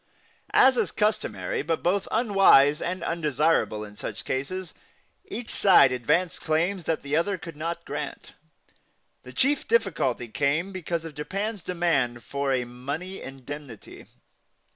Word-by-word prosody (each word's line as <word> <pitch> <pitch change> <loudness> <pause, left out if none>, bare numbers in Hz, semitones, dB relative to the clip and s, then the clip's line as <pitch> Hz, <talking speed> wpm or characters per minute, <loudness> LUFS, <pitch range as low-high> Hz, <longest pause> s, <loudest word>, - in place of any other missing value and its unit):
As 260 -1 +6
is - - +1
customary 215 0 -1
but 165 +2 -2
both 190 +3 +1
unwise 195 - +5
and 185 +2 -3
undesirable 155 -8 +1
in 105 0 -13
such 105 0 -6
cases, 165 +7 -3 0.5
each 245 - -6
side 180 -9 +6
advanced 165 +8 0
claims 170 +3 0
which 165 - 0
the 140 +1 -2
other 190 +5 +1
could 165 -2 -9
not 165 +3 -4
grant. - - -6 0.9
The - - -11
chief 285 +2 +1
difficulty 155 - +1
came 145 - 0
because 170 -3 -3
of 165 - -7
Japan's 195 +8 -4
demand 160 -9 0
for 140 -1 -2
a 130 -2 +1
money 140 +10 -6
indemnity. 135 -2 -9
165 Hz, 135 wpm, -26 LUFS, 140-190 Hz, 0.9 s, As